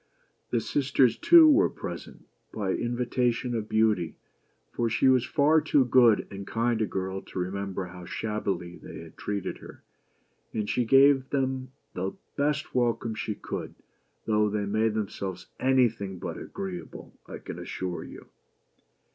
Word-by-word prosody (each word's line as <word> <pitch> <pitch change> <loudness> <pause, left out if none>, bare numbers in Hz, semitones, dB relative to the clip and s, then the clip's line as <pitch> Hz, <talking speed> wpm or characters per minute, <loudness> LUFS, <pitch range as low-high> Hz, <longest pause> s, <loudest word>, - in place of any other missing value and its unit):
The 120 - +1
sisters, 130 0 +2
too, 335 -2 +7
were 310 +6 +5
present, - - -8 0.3
by 100 -3 -2
invitation 120 +1 -1
of 110 -2 -3
Beauty, 110 -7 +2 0.6
for 120 -1 -1
she 120 +3 +2
was 130 -1 +4
far 155 +2 +4
too 140 -3 +3
good 120 -3 +5
and 100 0 -7
kind 115 0 0
a 110 - +1
girl 95 0 -3
to - - -11
remember 95 +1 -3
how 90 0 -10
shabbily 95 -5 -3
they - - -9
had - - -13
treated 100 -2 -4
her, - - -13 0.7
and 105 -2 -1
she 125 - 0
gave 135 +2 +5
them 130 -2 -1 0.2
the 95 +2 -3 0.2
best 150 +1 -1
welcome 120 -2 0
she 110 -1 -3
could, - - -6 0.5
though 105 -1 +2
they 105 0 -1
made 110 +2 +1
themselves 100 -3 -4
any 130 -1 +4
thing 100 -4 -6
but - - -5
agreeable, 95 -3 -7
I - - -7
can - - -8
assure 90 -1 -4
you. - - -11
110 Hz, 150 wpm, -27 LUFS, 100-130 Hz, 0.7 s, too